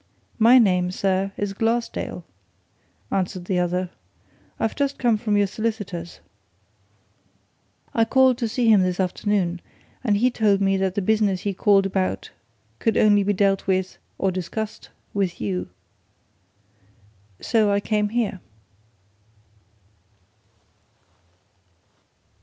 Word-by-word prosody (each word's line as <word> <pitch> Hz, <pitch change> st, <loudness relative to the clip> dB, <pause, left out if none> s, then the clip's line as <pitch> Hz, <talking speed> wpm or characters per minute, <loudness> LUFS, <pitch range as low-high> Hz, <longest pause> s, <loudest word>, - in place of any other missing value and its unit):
"My 235 Hz, +3 st, +7 dB
name, 180 Hz, -6 st, +3 dB
sir, 190 Hz, +1 st, -1 dB
is 205 Hz, -1 st, -2 dB
Glassdale," 230 Hz, +3 st, -2 dB, 0.9 s
answered 185 Hz, -1 st, -2 dB
the 180 Hz, -1 st, 0 dB
other. 180 Hz, +1 st, -1 dB, 0.7 s
"I've 225 Hz, -, -1 dB
just 280 Hz, -1 st, -1 dB
come 240 Hz, -3 st, +2 dB
from 210 Hz, -1 st, 0 dB
your 205 Hz, -, +3 dB
solicitor's. 200 Hz, -5 st, -4 dB, 1.7 s
I 225 Hz, -, +3 dB
called 260 Hz, +1 st, +3 dB
to 235 Hz, -, 0 dB
see 235 Hz, +2 st, 0 dB
him 215 Hz, -3 st, +6 dB
this 185 Hz, 0 st, -1 dB
afternoon 185 Hz, -1 st, -1 dB, 0.4 s
and 210 Hz, -5 st, +2 dB
he 250 Hz, +4 st, +2 dB
told 210 Hz, -4 st, +2 dB
me 195 Hz, 0 st, +2 dB
that 190 Hz, -1 st, -1 dB
the 205 Hz, -, -1 dB
business 210 Hz, -2 st, +1 dB
I 200 Hz, -, 0 dB
called 195 Hz, +1 st, +3 dB
about 190 Hz, -1 st, -2 dB, 0.5 s
could 225 Hz, -, +1 dB
only 205 Hz, -1 st, +5 dB
be 205 Hz, +1 st, +1 dB
dealt 195 Hz, 0 st, +1 dB
with 190 Hz, -1 st, -1 dB, 0.2 s
or 195 Hz, -, 0 dB
discussed 205 Hz, +4 st, -5 dB, 0.2 s
with 195 Hz, -4 st, -1 dB
you. 95 Hz, -4 st, -3 dB, 1.7 s
So 220 Hz, -3 st, +2 dB
I 200 Hz, -, +2 dB
came 210 Hz, 0 st, 0 dB
here." 220 Hz, -4 st, -1 dB
200 Hz, 120 wpm, -23 LUFS, 185-220 Hz, 1.7 s, My